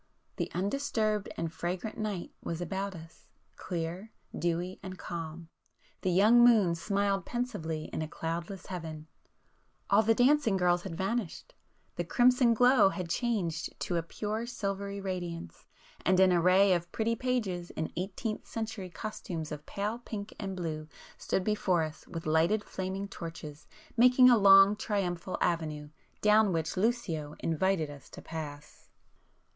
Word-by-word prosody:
—the - - -2
undisturbed 215 +1 0
and 165 -1 -3
fragrant 180 +5 -3
night 210 -5 -4
was 165 - -4
about 195 +2 -3
us, 165 -1 -13 0.3
clear, 175 +5 -5 0.2
dewy 175 +2 -2
and 185 -1 -7
calm,—the 165 +2 -7
young 215 +7 +6
moon 215 -8 +6
smiled 200 +2 0
pensively 170 -11 -3
in - - -2
a 155 - -2
cloudless 170 +4 -5
heaven,—all 165 +4 -4
the 225 +1 +3
dancing 255 -4 +4
girls 175 -1 +2
had 175 -2 -6
vanished,—the 225 - -5
crimson 245 -1 +4
glow 245 -3 +6
had 180 -3 -5
changed 185 -10 -1
to 175 - -2
a 170 - +2
pure 215 +7 -4
silvery 200 -4 -3
radiance, 175 - -5 0.4
and 185 0 +3
an 190 -1 +6
array 185 +3 +5
of 175 -1 -2
pretty 230 +1 0
pages 215 -9 -2
in 160 - -4
eighteenth 200 +4 -4
century 220 -4 -5
costumes 170 -5 -6
of 150 0 -7
pale 210 +4 -3
pink 215 -3 -7
and 195 -2 -4
blue, 155 -4 -4 0.3
stood 190 - -1
before 185 -5 +1
us 155 -1 -7
with 165 -2 -6
lighted 165 +7 +2
flaming 190 +1 -4
torches, 160 -4 -8 0.3
making 250 +1 +7
a - - +7
long 195 -1 +7
triumphal 185 -4 -2
avenue, 155 -3 -1 0.3
down 210 -1 +5
which 160 -2 -1
Lucio 185 -8 -1
invited 165 -1 0
us 145 -1 -13
to - - -11
pass. 150 -2 -8
190 Hz, 140 wpm, -30 LUFS, 165-215 Hz, 0.4 s, making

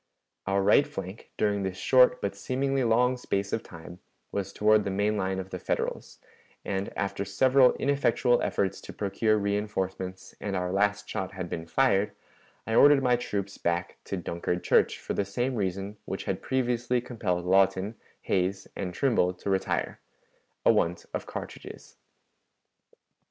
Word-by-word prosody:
Our 100 0 +2
right 105 +8 +5
flank, 95 +2 -8
during 105 -1 +1
this 95 -1 -3
short 125 +5 +4
but 100 - -1
seemingly 135 +5 -1
long 125 +2 +3
space 100 -5 -2
of 115 - 0
time, 85 +1 -11 0.3
was 100 -1 -3
toward 105 +1 +3
the 100 - -2
main 105 +2 +1
line 95 -2 -1
of 95 0 -6
the 90 - -4
Federals, - - -3 0.5
and, 95 0 -2
after 100 0 -2
several 130 +6 +4
ineffectual 135 -3 +2
efforts 100 -1 -1
to - - -9
procure 105 +2 +1
reënforcements 95 -2 -3
and 100 -2 -2
our 90 -1 -1
last 105 +1 +1
shot 95 0 -4
had 90 -2 -5
been 80 0 -4
fired, 105 -2 +2 0.5
I 110 - -3
ordered 140 +3 +6
my 125 -1 +4
troops 100 -5 -4
back 85 +1 -2
to 100 - -3
Dunkard 90 0 -3
church - - +3
for - - -5
the - - 0
same 120 +7 -2
reason 100 -1 -3
which - - -4
had - - -3
previously 125 -1 0
compelled 105 -8 -2
Lawton, 95 +2 +3 0.3
Hays, 95 +1 0
and 90 -2 -4
Trimble 105 -9 +2
to 100 +2 -4
retire 95 0 -1 0.7
(a - - +7
want 85 +1 0
of - - -4
cartridges). - - -8
100 Hz, 155 wpm, -28 LUFS, 95-115 Hz, 0.7 s, a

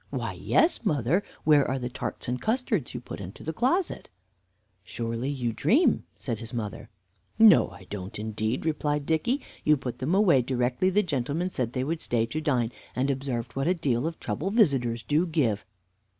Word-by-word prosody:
"Why, - - -3
yes, 325 -5 +2
mother. 150 - +2 0.2
Where 150 -2 +5
are 130 - 0
the 125 -1 -3
tarts 125 - -5
and 125 +1 -2
custards 220 - -1
you - - -2
put 115 - -8
into 95 0 -9
the 160 - -3
closet?" 275 - 0 0.7
"Surely 115 +5 -3
you 125 -5 -2
dream?" 260 - +3
said 115 -5 -3
his 115 +1 -7
mother. 105 -4 -5 0.5
"No, 220 -1 +7
I 90 0 -13
don't 95 +2 -7
indeed," 110 +5 -2
replied 150 -2 0
Dicky. 165 - +1 0.2
"You 150 0 +4
put 130 -2 -5
them 150 +8 0
away 185 -10 +5
directly 125 +7 +1
the 205 +3 +3
gentlemen 150 +3 -1
said 125 -5 -2
they 130 - -1
would 160 +4 -2
stay 115 -2 +1
to 150 +7 -4
dine, 125 -7 +1 0.2
and 135 +2 +1
observed 130 -3 -3
what 135 +2 0
a 180 - +3
deal 140 -4 0
of 165 - -5
trouble 125 - -2
visitors 135 - +2
do 155 +5 +1
give." 125 -12 0
135 Hz, 180 wpm, -27 LUFS, 120-165 Hz, 0.7 s, No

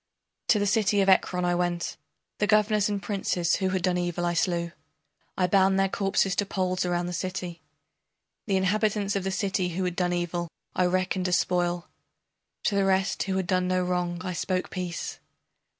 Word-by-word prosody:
To 215 - +5
the 205 - +1
city 205 0 +2
of 195 - +3
Ekron 180 -1 +3
I 175 - +2
went, 175 -1 -1 0.4
The 210 - +2
governors 210 -1 +3
and 200 -2 -2
princes 180 -4 0
who 190 -1 0
had 185 -1 -1
done 180 -1 +2
evil 175 0 -1
I 175 - +1
slew, 170 0 0 0.7
I 185 - +3
bound 190 +1 +4
their 195 0 +3
corpses 195 -1 +1
to 205 - +2
poles 185 -2 -1
around 175 0 0
the 175 - -4
city. 180 -1 -4 0.9
The 195 -2 +2
inhabitants 205 +1 +1
of 195 - -1
the 190 - -1
city 190 -1 0
who 190 - -1
had 180 -1 -1
done 180 -1 +1
evil 175 0 -2 0.3
I 180 - +3
reckoned 185 0 0
as 180 -1 +3
spoil; 175 -1 0 0.8
To - - +1
the 200 0 +2
rest 190 0 +1
who 190 -1 -1
had 190 - 0
done 185 -1 +1
no 185 0 +1
wrong 180 -1 -1
I 180 - -2
spoke 185 +1 -2
peace. 180 -3 -4
185 Hz, 190 wpm, -27 LUFS, 175-195 Hz, 0.9 s, To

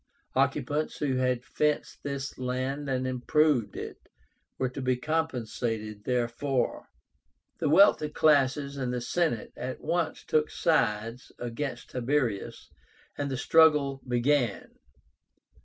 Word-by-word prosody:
Occupants 150 +2 0
who 135 -3 0
had 125 -1 0
fenced 150 +1 -1
this 140 -1 -5
land 130 +3 -2
and 130 -1 0
improved 130 -1 +1
it - - -6 0.6
were 130 - 0
to 130 +2 -6
be 130 -1 +1
compensated 120 -8 -2
therefor. 125 +2 -1 0.7
The - - +1
wealthy 155 -2 +5
classes 140 -2 +2
and 130 -2 -2
the 125 - -1
Senate 155 -1 -1
at 125 +1 -5
once 170 -2 -1
took 155 0 +2
sides 115 -6 0
against 120 +4 -5
Tiberius, 125 -4 -1 0.4
and 140 -1 -2
the 135 - -2
struggle 150 -3 +4
began. 125 -2 +1
130 Hz, 115 wpm, -28 LUFS, 125-150 Hz, 0.7 s, wealthy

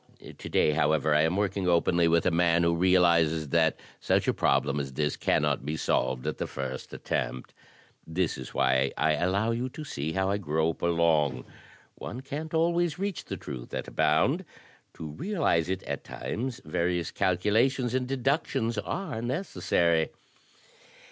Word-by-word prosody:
To - - -9
day, - - +3
however, 75 0 +2
I 75 - +4
am 80 +4 +1
working 100 -2 0
openly 85 0 +3
with 85 0 +3
a - - +3
man 85 0 +3
who 85 0 +2
realizes 85 -4 +3
that 80 +2 +2 0.2
such - - +1
a - - +3
problem 70 0 +1
as 70 -2 -4
this 75 +1 -1
cannot - - +1
be 75 +3 -3
solved 65 -3 0
at - - -3
the - - -2
first 65 -1 -6
attempt. 65 - -3 0.5
This 85 +1 -1
is - - -8
why 65 0 +2
I 80 - +2
allow 95 +8 +1
you 120 +3 -2
to 155 - -8
see 80 - -4
how 95 0 0
I 100 - +1
grope 80 -2 -1
along. 80 -6 +2 0.5
One 125 - -7
can't 150 +4 -5
always 170 0 +1
reach 195 -1 -3
the - - -5
truth 65 -5 -7
at - - -4
a - - -9
bound; 120 - +2 0.5
to 80 - -7
realize 130 - 0
it 95 0 -2
at - - -4
times 125 +1 -5
various 85 +2 -1
calcula 105 +6 +2
tions 125 -3 -3
and 130 -1 0
deductions 135 -3 0
are 155 - -4
necessary. 90 - 0
85 Hz, 165 wpm, -28 LUFS, 80-120 Hz, 0.5 s, I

